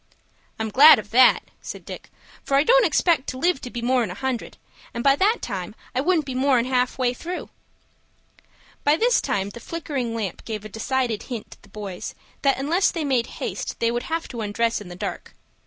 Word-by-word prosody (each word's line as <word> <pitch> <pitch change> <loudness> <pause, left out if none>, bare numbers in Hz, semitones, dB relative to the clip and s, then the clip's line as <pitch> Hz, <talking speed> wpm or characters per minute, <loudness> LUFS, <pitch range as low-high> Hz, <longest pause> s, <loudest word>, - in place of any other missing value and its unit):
"I'm 220 0 -2
glad 290 +7 +9
of 210 -1 -7
that," 250 +2 +6 0.2
said - - -8
Dick; - - -9 0.3
"for 275 - +1
I 280 - +5
don't - - +5
expect 330 -6 +2
to 255 - -5
live 335 +1 +1
to 250 - -6
be 240 -1 -6
more'n 245 -3 +2
a 180 - -6
hundred, 265 0 -4 0.4
and 235 - -3
by 275 0 +5
that 415 +9 +2
time 195 -1 -5 0.2
I 255 - +1
wouldn't 325 -1 +2
be 265 - -5
more'n 255 -2 +2
half 250 -1 +1 0.2
through." 350 +7 -6 1.3
By 290 +1 +4
this 480 +4 +3
time 195 +1 -1
the 235 - -10
flickering 275 -6 -4
lamp 210 -6 -4
gave 215 -2 -5
a - - -7
decided 235 +1 -1
hint 235 -4 -6
to - - -14
the 210 - -20
boys 200 -3 -7 0.3
that 275 -1 +3
unless 320 +8 +2
they 330 -3 -3
made 255 -4 +1 0.2
haste - - -4
they 230 0 +2
would 240 0 -1
have 330 +1 -2
to 235 -3 -5
undress 230 +2 0
in 205 - -10
the 175 - -8
dark. - - -6
255 Hz, 205 wpm, -23 LUFS, 220-290 Hz, 1.3 s, glad